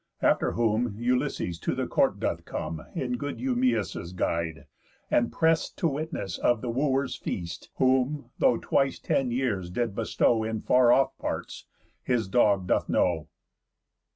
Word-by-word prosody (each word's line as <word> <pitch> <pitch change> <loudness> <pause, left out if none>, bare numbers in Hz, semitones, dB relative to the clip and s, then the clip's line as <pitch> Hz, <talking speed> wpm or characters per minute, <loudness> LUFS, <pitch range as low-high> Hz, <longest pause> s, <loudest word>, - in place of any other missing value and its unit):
After - - +3
whom 115 -1 +1
Ulysses 120 - -1
to - - -2
the - - -1
court - - +1
doth - - -2
come, 80 0 -5
In 125 -1 -2
good 145 +3 -4
Eumæus' 250 - -1
guide, 85 -2 -2 0.5
and 120 -1 +2
prest 160 0 +1
To 170 - +1
witness 145 - -3
of 120 -2 +2
the 120 - -2
Wooers' 135 +1 0
feast; 85 -2 -5
Whom, 130 0 +1
though 120 - +4
twice 135 -1 +1
ten 135 -2 0
years 120 -8 -1
did 115 +3 -1
bestow 115 +1 +1
In 110 0 -3
far 125 -1 +5
off 135 +2 +3
parts, - - -5 0.3
his 120 -5 0
dog 100 -3 +3
doth - - +1
know. 80 -4 +1
120 Hz, 150 wpm, -27 LUFS, 100-135 Hz, 0.5 s, far